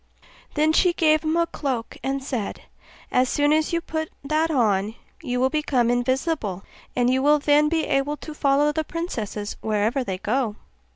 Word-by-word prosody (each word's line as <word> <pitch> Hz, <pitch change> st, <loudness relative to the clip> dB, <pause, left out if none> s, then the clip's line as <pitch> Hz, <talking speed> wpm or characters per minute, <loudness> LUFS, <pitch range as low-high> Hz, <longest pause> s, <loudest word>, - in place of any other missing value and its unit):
Then 310 Hz, +1 st, +3 dB
she 355 Hz, +2 st, +4 dB
gave 310 Hz, -2 st, +3 dB
him 315 Hz, +1 st, 0 dB
a 340 Hz, -, +3 dB
cloak, 260 Hz, -8 st, -4 dB
and 270 Hz, 0 st, -2 dB
said, 245 Hz, -7 st, -4 dB, 0.5 s
'As 250 Hz, 0 st, +3 dB
soon 290 Hz, +1 st, +2 dB
as 310 Hz, 0 st, +1 dB
you 335 Hz, 0 st, 0 dB
put 315 Hz, -1 st, -4 dB
that 310 Hz, +3 st, +1 dB
on 215 Hz, -7 st, +1 dB, 0.3 s
you 250 Hz, -5 st, -2 dB
will 260 Hz, +1 st, +2 dB
become 275 Hz, -6 st, +1 dB
invisible, 245 Hz, -, -1 dB, 0.3 s
and 245 Hz, -1 st, +2 dB
you 260 Hz, +1 st, +2 dB
will 295 Hz, +2 st, +5 dB
then 295 Hz, +1 st, +3 dB
be 325 Hz, -1 st, 0 dB
able 280 Hz, +2 st, 0 dB
to 310 Hz, -, -8 dB
follow 290 Hz, 0 st, +2 dB
the 315 Hz, +1 st, -1 dB
princesses 225 Hz, -, -4 dB
wherever 220 Hz, +5 st, 0 dB
they 190 Hz, -6 st, -3 dB
go. 220 Hz, +2 st, -1 dB
275 Hz, 175 wpm, -24 LUFS, 245-310 Hz, 0.5 s, will